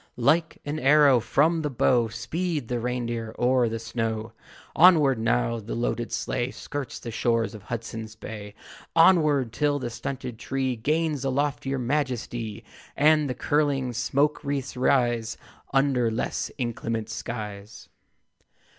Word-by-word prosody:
Like 155 +7 +2
an 145 +2 -3
arrow 140 -2 +6
from 155 +8 +2
the 150 - -1
bow 120 -2 +2
Speed 140 +5 -3
the 120 -1 -1
reindeer 120 -2 -3
o'er 125 -1 +3
the 115 - -3
snow. 115 -1 -3 0.4
Onward! 155 -8 +6
Now 115 +1 +1
the 110 +1 -6
loaded 120 0 -2
sleigh 120 +1 -1
Skirts 140 -1 -6
the 115 - -7
shores 115 0 0
of 110 - -9
Hudson's 110 0 -6
Bay. 105 -2 -8 0.4
Onward, 155 -8 +4
till 145 -1 +1
the 125 -4 -4
stunted 125 -1 -5
tree 130 -1 -1
Gains 150 +4 0
a 135 - 0
loftier 135 0 -1
majesty, 120 -4 -2 0.3
And 150 0 +4
the 125 - -2
curling 140 -4 0
smoke 140 +6 0
wreaths 140 -2 -3
rise 120 -3 +1 0.3
Under 135 -4 +2
less 110 +1 -2
inclement 115 -3 -3
skies. 105 -3 -7
125 Hz, 135 wpm, -26 LUFS, 115-145 Hz, 0.4 s, arrow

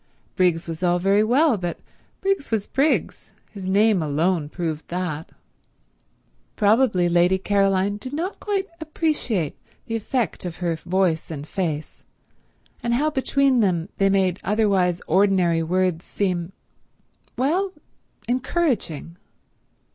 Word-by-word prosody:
Briggs 175 -3 +2
was 165 0 -5
all 175 -1 +2
very 195 +3 +3
well, 255 +3 +3
but 175 -2 -4 0.4
Briggs 390 -6 0
was 220 -3 0
Briggs; 285 +4 0 0.2
his 195 -3 -7
name 205 0 +3
alone 155 +1 0
proved 160 -2 -4
that. 170 -3 -4 1.3
Probably 210 -4 +3
Lady 175 +2 +3
Caroline 195 0 +1
did 255 +5 -8
not 335 +7 -3
quite 400 -2 -1
appreciate 300 - -1 0.3
the 225 - -3
effect 225 -1 -2
of 175 -2 -5
her 170 -1 -1
voice 175 -1 0
and 150 -2 -6
face, 160 -5 -4 0.8
and 235 0 0
how 300 +5 +1
between 270 -1 +2
them 180 -4 +1
they 195 0 +4
made 190 -2 +2
otherwise 195 -4 +1
ordinary 185 -4 +3
words 180 0 0
seem—well, 220 - -4 0.6
encouraging. 245 - -1
195 Hz, 115 wpm, -23 LUFS, 175-240 Hz, 1.3 s, they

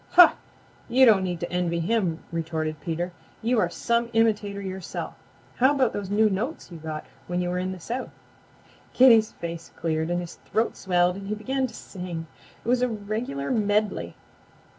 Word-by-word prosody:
"Huh! 355 -1 +9 0.6
You 260 +2 +6
don't 210 -5 +6
need 180 -2 -2
to 175 - -3
envy 175 -1 0
him," 180 -2 0
retorted 160 -2 -2
Peter. 175 +2 -2 0.3
"You 235 +1 +2
are 180 - +2
some 235 +5 0
imitator 210 -3 +2
yourself. 190 -2 -5 0.4
How 265 +4 +5
about 260 -4 +2
those 200 -2 -4
new 215 +2 +4
notes 215 - -3
you 170 - -8
got 155 -1 -5 0.2
when 175 0 -1
you 180 0 0
were 180 0 -1
in 185 +1 -2
the 185 - -7
South?" 240 +9 -4 0.8
Kitty's 230 -4 +7
face 170 0 -6
cleared, 160 0 -1
his 175 -1 -3
throat 225 +1 +1
swelled 180 -1 +2
and 195 0 -7
he 210 - -1
began 265 +4 -1
to 230 - -12
sing. 180 -4 -6 0.4
It - - -8
was 250 +1 +3
a 250 - +2
regular 210 - -3
medley. 210 -2 0
195 Hz, 175 wpm, -26 LUFS, 175-225 Hz, 0.8 s, Huh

